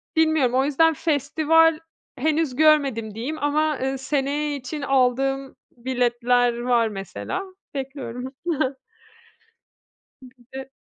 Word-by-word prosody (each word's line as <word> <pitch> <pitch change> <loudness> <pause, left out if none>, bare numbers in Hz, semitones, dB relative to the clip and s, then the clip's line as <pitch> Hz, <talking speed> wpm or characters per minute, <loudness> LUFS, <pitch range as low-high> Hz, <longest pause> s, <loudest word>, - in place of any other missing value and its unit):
bilmiyorum, 315 -6 +3
o 265 +1 +3
yüzden 325 +3 +3
festival 315 +2 +2 0.4
henüz 305 -1 0
görmedim 275 -8 +3
diyeyim, 260 +8 -4
ama, 300 0 +1
ııı, 265 +1 -1
seneye 285 +2 -1
için 280 +2 -6
aldığım 270 0 +1 0.2
biletler 245 -1 +1
var 240 -1 +2
mesela. 195 - -5 0.3
Bekliyorum. 265 -2 -6 1.9
Bir 255 -1 -14 0.2
de 265 0 -7
270 Hz, 100 wpm, -23 LUFS, 245-300 Hz, 1.9 s, bilmiyorum